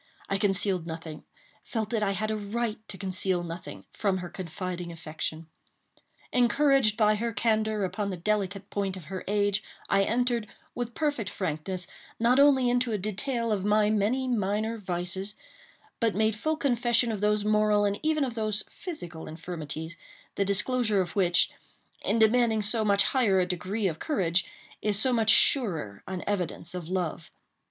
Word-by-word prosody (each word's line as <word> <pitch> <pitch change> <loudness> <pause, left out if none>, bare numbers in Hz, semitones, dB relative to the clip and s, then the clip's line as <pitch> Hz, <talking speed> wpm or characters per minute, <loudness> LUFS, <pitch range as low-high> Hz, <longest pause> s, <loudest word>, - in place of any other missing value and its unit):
I 195 - 0
concealed 195 -3 +1
nothing—felt 165 +7 -7
that 225 -2 0
I 200 -1 +1
had 215 +3 -2
a - - 0
right 215 +2 -2
to 195 - -7
conceal 185 -2 -1
nothing—from 180 +3 -4
her 180 -1 -6
confiding 180 -1 -5
affection. 160 -1 -5 0.9
Encouraged 250 -2 +3
by 215 -2 +4
her 230 +2 -1
candor 220 -2 +1
upon 195 +2 -2
the 185 - -4
delicate 200 +1 -2
point 195 -2 -2
of 185 - -9
her 185 - -4
age, 205 0 +1 0.3
I 195 - +4
entered, 235 +1 +1 0.3
with 240 -1 -4
perfect 290 -10 -1
frankness, 185 +1 -3 0.3
not 240 +3 +4
only 275 -3 +5
into 245 0 +1
a 215 - 0
detail 225 +4 -2
of 200 -3 0
my 210 +1 +3
many 220 +5 +1
minor 220 0 0
vices, 190 +1 -1 0.6
but 230 -3 +1
made 220 +1 +2
full 310 +8 -1
confession 240 -4 +2
of 210 -2 -4
those 210 0 +2
moral 210 -1 +3
and 200 0 0
even 310 -1 +1
of 255 -3 -2
those 215 -2 -1
physical 175 - -6
infirmities, 160 0 -6 0.4
the 200 - +1
disclosure 210 +2 +2
of 180 -2 -2
which, 180 -3 +3 0.5
in - - +1
demanding 220 -1 +4
so 220 +2 +3
much 200 -1 +4
higher 220 -8 +2
a 180 - +3
degree 185 +4 -2
of 165 -3 -3
courage, 185 - +1 0.4
is 210 -2 +1
so 255 +4 +4
much 225 -2 +2
surer 165 - +4
an 185 -2 -4
evidence 180 -3 -2
of 175 -2 -6
love. 175 -4 -2
205 Hz, 160 wpm, -28 LUFS, 185-230 Hz, 0.9 s, only